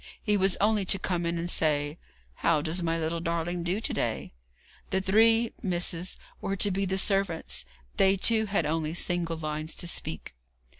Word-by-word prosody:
He 210 - +2
was 190 -2 +2
only 210 0 +3
to 195 - +2
come 175 -2 -1
in 170 0 -1
and 170 +1 -2
say: 150 -2 +1 0.4
'How 155 -3 +2
does 165 +3 0
my 165 -1 0
little 165 +1 -2
darling 170 +1 -2
do 175 +4 -1
to 225 - -2
day?' - - -2 0.6
The 190 - +1
three 225 +4 +4
Miss 175 -3 +1
s 175 +2 -2 0.2
were 195 - -1
to 200 +1 +2
be 195 +1 0
the 190 0 -1
servants; 180 - 0 0.3
they, 195 0 +4
too, 220 +2 +3
had 200 -5 0
only 160 +1 -1
single 175 -2 -1
lines 155 0 -4
to - - -3
speak. 80 - -3
175 Hz, 185 wpm, -28 LUFS, 165-195 Hz, 0.6 s, three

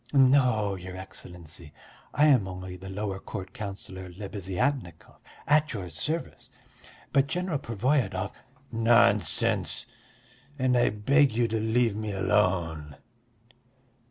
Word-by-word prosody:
"No, 125 -7 +4
your 95 0 -7
Excellency, 85 -4 -10 0.4
I 150 - +4
am 130 -10 +5
only 95 0 -7
the 95 +1 -9
lower 95 0 -3
court 95 -2 -7
councillor 95 -2 -6
Lebeziatnikov, 95 - -3 0.3
at 150 0 +3
your 95 -5 -5
service, 155 - -4 0.6
but 140 0 +4
General 175 -1 -1
Pervoyedov...." 115 -5 0 0.4
"Nonsense! 115 -5 +2 0.7
And 130 -2 +2
I 120 - +4
beg 135 +6 +3
you 120 +1 +2
to 110 0 0
leave 110 0 +2
me 110 -1 -3
alone." 90 -7 0
105 Hz, 110 wpm, -28 LUFS, 95-125 Hz, 0.7 s, am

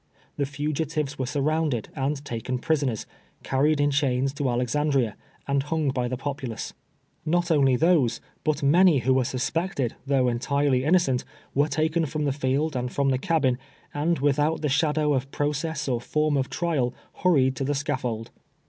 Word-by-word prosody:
The 140 - -1
fugitives 145 0 -2
were 130 - -1
surrounded 145 -3 0
and 140 +1 -2
taken 120 +2 -3
pris 155 +3 0
oners, 125 -7 -2 0.4
carried 145 +3 +2
in 145 0 +3
chains 135 -1 +1
to 140 -2 -1
Alexandria, 125 -1 +1 0.3
and 140 0 +2
hung 150 0 -1
by 125 -2 -1
the 125 +1 -3
popidace, 135 -4 -5 0.5
Xot 175 +1 +1
only 135 -4 +4
those, 145 -6 +3 0.2
but 155 -1 0
many 170 +3 +5
who 130 - +4
were 130 0 +3
suspected, 130 +1 -2
though 135 -2 +3
entirely 130 +2 +1
innocent, 155 -6 +3 0.3
wei'e 145 +3 +3
taken 160 +1 +1
from 150 +1 -2
the 140 - +1
field 140 +2 0
and 125 0 -2
from 140 -1 +1
the 130 -1 +1
cabin, 135 -7 +1 0.3
and 160 +3 +1
without 145 +3 +1
the 150 - +1
shadow 150 +1 +2
of 135 0 -1
process 150 +2 -2
or 120 -3 0
form 150 +3 0
of 135 -2 0
trial, 145 -8 -1 0.3
hurried 135 -8 +4
to 135 - -1
the 145 +2 0
scaffold. 125 -5 -3
140 Hz, 165 wpm, -25 LUFS, 130-155 Hz, 0.5 s, many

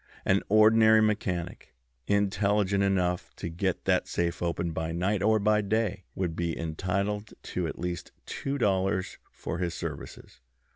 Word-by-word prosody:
An 95 +1 +3
ordinary 110 +1 +6
mechanic, 90 - -1 0.3
intelligent 100 0 +2
enough 90 -2 0
to - - -5
get 90 +2 -2
that - - +2
safe 85 -1 -1
open 85 0 -1
by 80 0 -3
night 95 +4 0
or 110 +2 +4
by 105 0 +3
day, 105 -2 -1
would 90 -4 -2
be 85 -1 -2
entitled 100 +6 -2
to 90 -2 -2
at - - -6
least 90 0 -4
two 140 +1 -3
dollars 95 -4 0
for - - -5
his 85 -2 -2
services. 80 -5 -7
95 Hz, 145 wpm, -28 LUFS, 85-105 Hz, 0.3 s, ordinary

